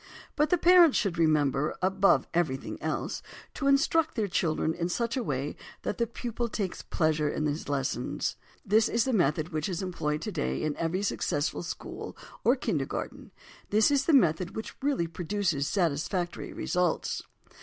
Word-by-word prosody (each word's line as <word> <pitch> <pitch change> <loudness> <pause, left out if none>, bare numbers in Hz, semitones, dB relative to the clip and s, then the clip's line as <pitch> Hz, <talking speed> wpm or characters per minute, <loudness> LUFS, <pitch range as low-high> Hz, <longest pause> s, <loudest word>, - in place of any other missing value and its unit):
But 300 0 +2
the 360 - +4
parents 345 -3 +6
should 180 -5 0
remember, 150 -3 +2
above 190 +1 +3
everything 155 -6 -1
else, - - -2 0.3
to 275 - -2
instruct 310 +3 +3
their 220 -4 0
children 160 -3 0
in 170 +1 -2
such 235 +6 -1
a 260 - 0
way 140 - -2 0.3
that - - -3
the 235 - +2
pupil 235 0 -4
takes 200 -4 -3
pleasure 155 -3 +1
in 155 - -2
his 150 0 -2
lessons. 135 -3 -1 0.3
This 215 +2 +4
is 230 -1 +2
the 260 - 0
method 155 -4 +2
which 155 +1 -2
is 185 +1 -3
employed 150 -5 -2
today 65 +1 -2
in 155 -1 -1
every 175 +4 -1
successful 150 -6 -1
school 175 - -7 0.3
or - - +5
"kindergarten"; - - -3 0.4
this 215 +6 +4
is 280 -1 +2
the - - +3
method 175 - +3
which 220 - -6
really 275 -11 +1
produces 170 -3 -1
satisfactory 175 0 -1
results. 180 -2 -1
180 Hz, 160 wpm, -29 LUFS, 155-225 Hz, 0.4 s, parents